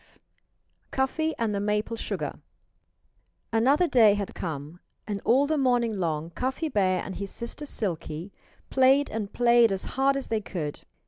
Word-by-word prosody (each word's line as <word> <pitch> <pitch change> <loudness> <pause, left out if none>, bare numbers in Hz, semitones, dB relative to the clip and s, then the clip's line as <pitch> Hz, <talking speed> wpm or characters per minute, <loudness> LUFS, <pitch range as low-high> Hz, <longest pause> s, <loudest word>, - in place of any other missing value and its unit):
V - - -28 0.8
CUFFY 315 +4 0
AND 225 -3 0
THE 200 - -1
MAPLE 210 +2 -1
SUGAR - - -4 1.1
Another 270 +10 +4
day 225 -10 +5
had 200 -1 -4
come 155 0 -6 0.3
and 200 -1 -4
all 265 +4 +4
the 305 0 0
morning 245 -4 +2
long 160 -1 -2
Cuffy 265 - -2
Bear 190 -7 +1
and 190 - -6
his 200 0 -4
sister 240 +8 -6
Silkie 170 - -4 0.4
played 270 +2 +4
and 210 -2 -3
played 235 -2 +4
as 190 -1 -2
hard 275 +1 +2
as 275 - -5
they 220 -1 0
could. 155 -8 -5
225 Hz, 155 wpm, -27 LUFS, 195-265 Hz, 1.1 s, day